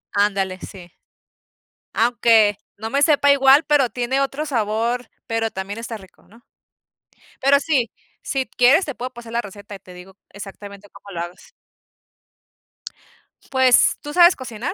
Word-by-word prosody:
Ándale, 195 -2 0
sí. 180 -3 -12 1.0
Aunque 225 -3 +3 0.2
no 220 +2 -6
me 280 +3 0
sepa 285 -2 +4
igual, 275 +2 +5
pero 285 -5 +2
tiene 250 +2 -2
otro 275 +2 -2
sabor, 235 -1 -1 0.2
pero 225 -1 -2
también 195 +3 -6
está 230 0 -6
rico, 190 -3 -19
¿no? 230 +4 -21 1.0
Pero 280 +1 +4
sí, 270 -7 0 0.3
si 270 -1 -2
quieres 275 +9 +3
te 285 - -6
puedo 250 +1 -6
pasar 235 -1 -11
la 235 - 0
receta, 205 -1 -11
y - - -11
te 185 -1 -15
digo, 185 +2 -14
exactamente, 200 0 -11
cómo 200 - -15
lo 170 - -4
hagas. 175 +1 -15 2.0
Pues 260 -2 +4
¿Tú 295 - -8
sabes 350 +1 +6
cocinar? 240 -2 -6
235 Hz, 145 wpm, -20 LUFS, 205-270 Hz, 2.0 s, sabes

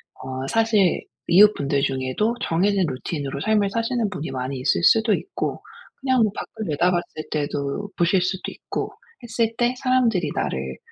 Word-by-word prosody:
어 130 0 -6
사실 220 -2 +2 0.3
이웃분들 170 -7 +5
중에도 135 - 0
정해진 190 +3 +2
루틴으로 140 0 -4
삶을 210 0 +2
사시는 230 0 0
분이 160 -2 -5
많이 130 +1 -3
있을 130 +6 +1
수도 220 +3 +5
있고 390 - -3 0.4
그냥 260 -2 +2
뭐 210 - +2
밖을 220 - -6
내다봤을 175 0 0
때도 145 +5 -2
보실 175 +1 +3
수도 185 +1 -2
있고 - - -5 0.3
했을 230 -1 0
때 240 +1 +2
사람들이 235 - +2
나를 65 0 -2
185 Hz, 320 characters per minute, -23 LUFS, 140-220 Hz, 0.4 s, 이웃분들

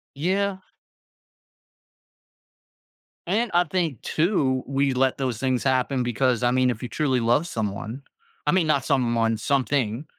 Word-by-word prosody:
Yeah. 190 +6 0 2.7
And 220 +6 +1
I 175 +1 +4
think 165 - -2
too, 150 -7 0
we 140 0 +1
let 130 0 +1
those 130 -5 -2
things 130 -1 0
happen 130 0 +1
because, 125 0 0
I 120 - +3
mean, 130 0 +2
if 120 0 -3
you 125 - -4
truly 130 +1 0
love 120 +8 +2
someone 110 - -4 0.4
I - - +4
mean 180 -4 +2
not 140 -4 +1
someone, 115 -4 +1
something, 130 0 0
130 Hz, 135 wpm, -24 LUFS, 120-150 Hz, 2.7 s, I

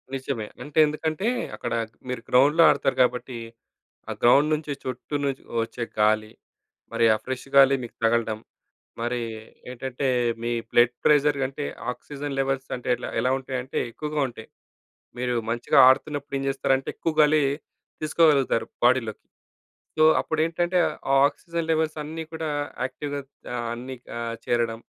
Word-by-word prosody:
నిజమే. 130 -5 -4 0.2
అంటే 150 +3 -1
ఎందుకంటే, 155 +5 -2 0.3
అక్కడా 115 -1 -3
క్ - - -34
మీరు 125 -2 -3
గ్రౌండ్‌లో 145 +6 +5
ఆడతారు 135 - +1
కాబట్టి, 125 0 -2 0.7
ఆ - - -2
గ్రౌండ్ 140 +6 +5
నుంచి 150 -1 -5
చుట్టూ 130 +3 -5
నుంచి 135 -1 -3 0.2
ఒచ్చే 120 +1 -5 0.2
గాలి. 110 0 +2 0.6
మరి 115 0 +3
ఆ - - -2
ఫ్రెష్ 130 +1 -5
గాలి 135 0 +7
మీకు 120 - -9
తగలడం. 115 -1 +1 0.6
మరీ 120 +1 -1 0.5
ఏంటంటే, 130 +2 -3 0.4
మీ 120 - -1 0.2
బ్లడ్ 120 0 +4
ప్రెషర్ 145 -1 +4
కంటే 135 +2 -3 0.3
ఆక్సిజన్ 140 +2 -6
లెవెల్స్ 135 0 -1
అంటే, 125 - -11
ఎట్ల 120 - -7
ఎలా 130 - +1
ఉంటాయంటే, 130 -1 -4
ఎక్కువగా 150 +4 -3
ఉంటాయి. 115 -2 -11 0.7
మీరు 125 -1 0 0.2
మంచిగా 120 0 +2
ఆడుతున్నప్పుడు 145 +1 0
ఏం - - -4
చేస్తారంటే, 135 0 0
ఎక్కువ 165 - -2
గాలీ 150 0 +4 0.6
తీసుకోగలుగుతారు 150 -7 +3 0.2
బాడీలోకి. 120 -3 +1 0.7
సో, 155 - +5 0.2
అప్పుడేంటంటే, 165 +3 0 0.4
ఆ - - +6
ఆక్సిజన్ 165 +2 -5
లెవెల్సన్నీ 155 0 -2
కూడా 160 -1 -3 0.4
యాక్టివ్‌గా 140 +2 -4 0.3
ఆహ్, 120 -1 -3
అన్నీ 125 +2 -7 0.2
ఆహ్, 115 0 -3
చేరడం. 115 -1 0
135 Hz, 135 wpm, -25 LUFS, 120-150 Hz, 0.7 s, గాలి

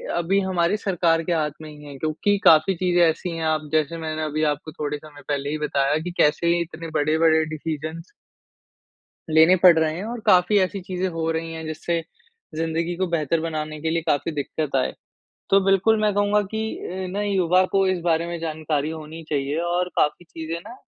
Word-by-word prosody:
अभी 175 +3 +1
हमारी 185 0 +1
सरकार 170 -5 +1
के 175 - -1
हाथ 155 -2 0
में 155 - -9
ही 150 0 -13
है 140 -1 -9
क्योंकि 160 +8 0
काफ़ी 160 +4 +6
चीज़ें 175 0 +1
ऐसी 165 +2 +1
है 165 - -3
आप 155 -1 -1
जैसे 155 +1 0
मैंने 155 -1 -4
अभी 155 +1 -1
आपको 150 +2 -6
थोड़े 150 -1 -4
समय 145 -1 -14
पहले 145 -1 -2
ही 155 - -2
बताया 145 -1 +1
कि 180 - -4
कैसे 170 +3 +3
इतने 165 0 -6
बड़े-बड़े 160 +1 +3
डिसीजंस 160 +1 -5 1.3
लेने 160 +4 +6
पड़ 175 -3 +8
रहे 160 -1 +1
हैं 185 - -5
और 235 +1 -5
काफ़ी 185 +3 +5
ऐसी 190 +1 0
चीज़ें 185 0 -3
हो 165 -2 -2
रही 165 0 -3
हैं, 160 0 -6
जिससे 160 +2 -2 0.5
जिंदगी 165 +2 -2
को 185 +1 0
बेहतर 165 -1 0
बनाने 155 -2 -4
के 160 - -1
लिए 165 0 0
काफ़ी 145 +3 0
दिक्कत 145 0 -3
आए। 130 - 0 0.6
तो 195 - +6
बिल्कुल, 195 +3 +3
मैं 210 -1 +2
कहूँगा 205 +1 +2
कि 220 0 -3
अ, 185 +1 -5
नए 205 - -1
युवा 185 -1 +3
को 195 -1 +3
इस 185 -2 0
बारे 165 -1 +1
में 170 0 -4
जानकारी 155 -2 -2
होनी 160 0 -8
चाहिए 145 0 -1
और 175 +1 -1
काफ़ी 150 +4 +1
चीज़ें 165 +1 -6
ना, 240 - -10
165 Hz, 195 wpm, -23 LUFS, 155-180 Hz, 1.3 s, पड़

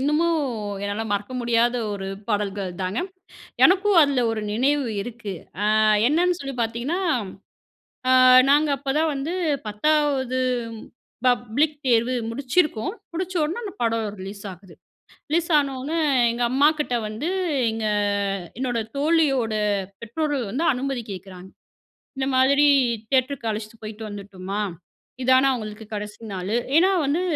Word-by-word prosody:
இன்னமு 300 +5 +2 0.5
என்னால 205 +2 -2
மறக்க 205 +4 -2
முடியாத 235 +1 +2 0.2
ஒரு 195 -1 -5 0.2
பாடல்கள் 200 -3 -1
தாங்க. 185 +5 -1 0.6
எனக்கும் 390 +1 +4
அதுல 275 -4 +2
ஒரு 220 -1 -2
நினைவு 275 +5 +1 0.2
இருக்கு. 230 -3 -7 0.5
அ - - +4 0.3
என்னான்னு 350 +3 +2
சொல்லி 275 -1 -5
பாத்தீங்கன்னா, 240 +10 -2 1.1
அ - - +5 0.4
நாங்க 295 +2 +4
அப்பதான் 300 +3 0
வந்து 290 +6 -3 0.3
பத்தாவது 265 +2 +1 0.9
பப்ளிக் 250 +5 +1
தேர்வு 240 +1 +3 0.2
முடிச்சிருக்கோம். 275 - 0 0.2
முடிச்ச 370 +2 -4
உடன 330 +10 -2
அந்த 395 - -5
படம் 225 -1 0
ரிலீஸ் 200 +1 -8
ஆகுது. 180 -1 -15 0.6
ரிலீஸ் 335 +2 +1
ஆனொன்ன 275 +1 -1 0.4
எங்க 240 +1 -2
அம்மாகிட்ட 290 -1 +2
வந்து, 225 +11 -4 0.4
எங்க 220 -1 -3 0.7
என்னோட 245 -3 -1 0.2
தோழியோட 280 -7 +2 0.5
பெற்றோர்கள் 265 -1 -2
வந்து 310 +8 -1
அனுமதி 260 -1 -3
கேக்கறாங்க 185 0 -9 0.7
"இந்த 265 0 -1
மாதிரி 280 +3 +4 0.4
தியேட்டருக்கு 260 -3 0
அழைச்சிட்டு 215 +1 -7
போய்ட்டு 215 0 -7
வந்துட்டுமா, 200 0 -5 0.6
இதான 260 +1 +5
அவுங்களுக்கு 215 -3 -5
கடைசி 210 +1 -7
நாளு?" 190 +4 -3 0.2
ஏன்னா, 375 +3 +5
வந்து 300 +6 +1
255 Hz, 120 wpm, -23 LUFS, 215-295 Hz, 1.1 s, அ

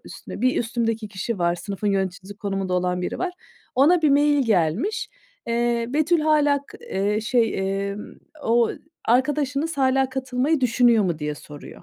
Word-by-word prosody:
üstüne, - - -9
bir 255 +1 +3
üstümdeki 225 -2 -1
kişi 200 +2 -4
var, 175 0 +2
sınıfın 195 +3 -5
yöneticisi 195 0 -2
konumunda 195 -3 -2
olan 180 0 0
biri - - -3
var. 365 -1 -2 0.4
Ona 320 +6 +4
bir 300 - +4
mail 290 -2 +3
gelmiş. 195 - +1 0.4
Eee, 235 0 +1
"Betül 310 +5 +2
hâlâ 295 -2 +3
k 420 - -13
eee, 210 - -1
şey, 230 -1 +1 0.3
ımm, 210 - -9 0.3
o 230 0 +3 0.4
arkadaşınız 285 +4 +1
hâlâ 265 0 +3
katılmayı 265 +3 0
düşünüyor 235 -3 +4
mu?" 170 -4 -1
diye 150 0 -3
soruyor. 145 0 -12
235 Hz, 150 wpm, -23 LUFS, 195-280 Hz, 0.4 s, Ona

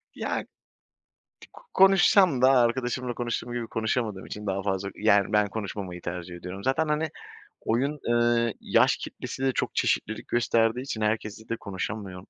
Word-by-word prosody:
Ya - - -2
k - - -23 1.3
konuşsam 190 -6 +5
da, 130 +1 +6
arkadaşımla 125 0 +1
konuştuğum 120 0 -3
gibi 120 -2 -3
konuşamadığım 110 -3 -2
için 105 0 -7
daha 95 0 -1
fazla 100 0 -1
Yani, 100 -1 +3
ben 105 -1 +3
konuşmamayı 95 -4 -5
tercih 90 0 -6
ediyorum. 90 +3 -8
Zaten 150 +4 +1
hani, 150 +1 0 0.5
oyun, 135 +6 0
eee, 120 -1 +2
yaş - - +3
kitlesi 135 - -7
de 135 - +3
çok - - -2
çeşitlilik 110 +1 0
gösterdiği 115 0 +2
için 115 -5 -5
herkesle 110 0 -2
de 115 - -1
konuşulmuyor. 95 -1 -5
115 Hz, 145 wpm, -26 LUFS, 100-125 Hz, 1.3 s, da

